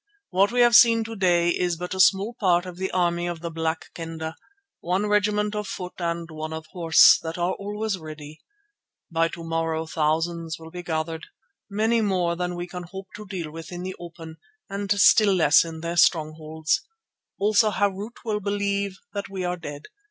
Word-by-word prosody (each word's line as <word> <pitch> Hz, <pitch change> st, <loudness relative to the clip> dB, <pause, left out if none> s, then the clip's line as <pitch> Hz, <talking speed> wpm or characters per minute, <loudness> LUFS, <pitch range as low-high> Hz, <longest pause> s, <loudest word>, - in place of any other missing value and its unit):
What 195 Hz, +3 st, +3 dB
we 245 Hz, 0 st, +2 dB
have 240 Hz, -1 st, +6 dB
seen 230 Hz, -1 st, +7 dB
to 225 Hz, 0 st, -7 dB
day 175 Hz, -3 st, +3 dB
is 175 Hz, -1 st, 0 dB
but 180 Hz, +2 st, -5 dB
a 190 Hz, -, -5 dB
small 195 Hz, +4 st, +4 dB
part 180 Hz, -4 st, +3 dB
of 180 Hz, -1 st, -8 dB
the 190 Hz, +1 st, -2 dB
army 175 Hz, -1 st, 0 dB
of 170 Hz, -2 st, -5 dB
the 170 Hz, -1 st, -4 dB
Black 160 Hz, 0 st, -3 dB
Kendah, 160 Hz, -1 st, -6 dB, 0.4 s
one 185 Hz, +4 st, 0 dB
regiment 210 Hz, 0 st, +1 dB
of 210 Hz, -1 st, -3 dB
foot 180 Hz, -1 st, -6 dB
and 170 Hz, -1 st, -2 dB
one 155 Hz, 0 st, -6 dB
of 160 Hz, 0 st, -6 dB
horse, 165 Hz, -3 st, +6 dB
that 165 Hz, +1 st, -5 dB
are 175 Hz, +1 st, 0 dB
always 205 Hz, 0 st, -3 dB
ready. 155 Hz, -1 st, -10 dB, 0.7 s
By 165 Hz, 0 st, +2 dB
to 165 Hz, 0 st, -8 dB
morrow 165 Hz, -1 st, -1 dB
thousands 160 Hz, +1 st, -1 dB
will 160 Hz, 0 st, -12 dB
be 180 Hz, -, -6 dB
gathered, 160 Hz, -1 st, -3 dB, 0.4 s
many 220 Hz, +3 st, +1 dB
more 180 Hz, -5 st, +1 dB
than 180 Hz, 0 st, -3 dB
we 175 Hz, 0 st, -4 dB
can 180 Hz, 0 st, -7 dB
hope 190 Hz, 0 st, -9 dB
to 210 Hz, 0 st, -9 dB
deal 175 Hz, -5 st, -5 dB
with 165 Hz, +2 st, -9 dB
in 175 Hz, 0 st, -6 dB
the 185 Hz, 0 st, -5 dB
open 165 Hz, -2 st, -10 dB, 0.3 s
and 200 Hz, 0 st, -4 dB
still 200 Hz, 0 st, +5 dB
less 170 Hz, -, +5 dB
in 160 Hz, -1 st, -8 dB
their 170 Hz, +1 st, -3 dB
strongholds, 155 Hz, -1 st, +1 dB, 0.6 s
also 215 Hz, +2 st, +3 dB
Harût 205 Hz, +2 st, -1 dB
will 215 Hz, -2 st, -1 dB
believe 200 Hz, -1 st, -1 dB, 0.2 s
that 200 Hz, -1 st, -4 dB
we 190 Hz, -2 st, -4 dB
are 180 Hz, 0 st, -1 dB
dead. 145 Hz, -4 st, -8 dB
175 Hz, 190 wpm, -25 LUFS, 165-200 Hz, 0.7 s, seen